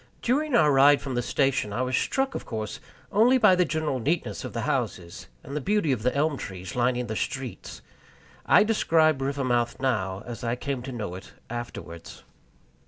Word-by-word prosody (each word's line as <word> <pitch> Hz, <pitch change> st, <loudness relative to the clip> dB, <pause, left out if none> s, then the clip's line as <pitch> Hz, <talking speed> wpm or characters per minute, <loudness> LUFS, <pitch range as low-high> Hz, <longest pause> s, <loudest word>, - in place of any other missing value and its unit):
During 280 Hz, +3 st, +1 dB
our 150 Hz, -6 st, +5 dB
ride 140 Hz, +1 st, +6 dB
from 135 Hz, -, -5 dB
the 120 Hz, -, 0 dB
station, 135 Hz, -3 st, 0 dB
I 120 Hz, +5 st, -1 dB
was 130 Hz, 0 st, -1 dB
struck, 270 Hz, -, 0 dB
of -, -, -5 dB
course, 110 Hz, -2 st, -5 dB, 0.3 s
only 235 Hz, +6 st, +5 dB
by 215 Hz, -6 st, +6 dB
the 180 Hz, 0 st, +3 dB
general 155 Hz, -4 st, -1 dB
neatness 155 Hz, +8 st, -2 dB
of -, -, -5 dB
the -, -, -3 dB
houses 85 Hz, -1 st, -3 dB, 0.2 s
and 140 Hz, -, -7 dB
the 150 Hz, -, -1 dB
beauty 205 Hz, -2 st, +1 dB
of 125 Hz, -5 st, -1 dB
the 125 Hz, +4 st, 0 dB
elm 145 Hz, 0 st, +1 dB
trees 95 Hz, -1 st, -7 dB
lining 125 Hz, 0 st, +1 dB
the 110 Hz, -2 st, -4 dB
streets. 130 Hz, +1 st, -5 dB, 0.6 s
I -, -, +6 dB
describe 160 Hz, -9 st, +2 dB
Rivermouth 130 Hz, -4 st, 0 dB
now 105 Hz, -7 st, -1 dB
as 120 Hz, 0 st, -7 dB
I 115 Hz, 0 st, 0 dB
came 135 Hz, 0 st, -4 dB
to 130 Hz, +2 st, -7 dB
know 105 Hz, -7 st, -5 dB
it 95 Hz, +2 st, -10 dB, 0.2 s
afterwards. 115 Hz, -8 st, -8 dB
135 Hz, 185 wpm, -26 LUFS, 120-155 Hz, 0.6 s, ride